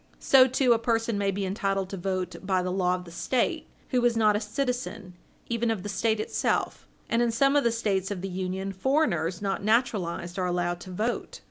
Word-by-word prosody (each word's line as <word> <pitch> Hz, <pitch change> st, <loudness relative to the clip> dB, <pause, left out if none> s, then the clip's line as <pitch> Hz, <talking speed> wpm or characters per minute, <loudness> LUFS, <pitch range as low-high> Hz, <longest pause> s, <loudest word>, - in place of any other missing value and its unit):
So, 265 Hz, -1 st, +6 dB
too, 255 Hz, -1 st, +3 dB
a 230 Hz, -, +1 dB
person 225 Hz, -1 st, 0 dB
may 200 Hz, -1 st, +1 dB
be 195 Hz, 0 st, -2 dB
entitled 195 Hz, -1 st, -1 dB
to -, -, -3 dB
vote 185 Hz, -1 st, -3 dB
by 185 Hz, -1 st, 0 dB
the 180 Hz, -, -2 dB
law 180 Hz, -1 st, +1 dB
of 180 Hz, 0 st, -7 dB
the 170 Hz, -, -11 dB
State, 240 Hz, +8 st, -1 dB, 0.2 s
who 250 Hz, -2 st, +1 dB
is 240 Hz, -1 st, +3 dB
not 215 Hz, -2 st, +4 dB
a -, -, +1 dB
citizen 215 Hz, -5 st, -3 dB, 0.3 s
even 235 Hz, 0 st, 0 dB
of 215 Hz, -5 st, -1 dB
the 205 Hz, -, -4 dB
State 220 Hz, +1 st, 0 dB
itself. 215 Hz, -, -1 dB, 0.2 s
And 230 Hz, -, +1 dB
in 240 Hz, -, +2 dB
some 275 Hz, +5 st, +3 dB
of 290 Hz, -, +4 dB
the 235 Hz, -, +3 dB
States 200 Hz, -5 st, -1 dB
of 200 Hz, -3 st, -4 dB
the 195 Hz, -, -3 dB
Union, 190 Hz, +1 st, -3 dB
foreigners 195 Hz, -, 0 dB
not 195 Hz, 0 st, -1 dB
naturalized 200 Hz, -6 st, 0 dB
are 180 Hz, -, 0 dB
allowed 175 Hz, 0 st, -1 dB
to 185 Hz, -, -10 dB
vote. 215 Hz, +6 st, -3 dB
205 Hz, 215 wpm, -27 LUFS, 185-235 Hz, 0.3 s, So